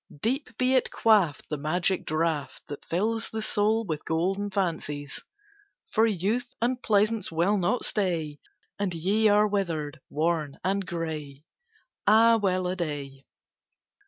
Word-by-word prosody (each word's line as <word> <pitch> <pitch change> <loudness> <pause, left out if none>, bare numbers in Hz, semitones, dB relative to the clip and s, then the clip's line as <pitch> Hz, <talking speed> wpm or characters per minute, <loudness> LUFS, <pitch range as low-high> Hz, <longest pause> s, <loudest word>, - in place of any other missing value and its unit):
Deep 250 0 -2
be 255 +1 +2
it 255 - +3
quaffed, 200 -10 +2
the 150 - -2
magic 175 +5 0
draught 155 -3 -1
That 145 - -7
fills 220 +6 -1
the 220 0 -4
soul 215 +2 +1
with 155 -5 -4
golden 190 +5 -1
fancies! 160 -7 -3 0.7
For 225 +1 +4
Youth 215 +5 0
and 245 +2 0
Pleasance 215 -1 +2
will 170 +6 +2
not 200 +6 0
stay, 165 -8 -1 0.4
And 195 -4 -1
ye 200 +7 +2
are 210 +1 +5
withered, 165 -8 -2
worn, 155 -2 -1
and 195 +1 0
gray. 155 -4 -5 0.6
Ah, 225 +2 +6
well 185 -3 0
a 180 +1 -1
day! 145 -6 -5
185 Hz, 135 wpm, -27 LUFS, 160-215 Hz, 0.7 s, Ah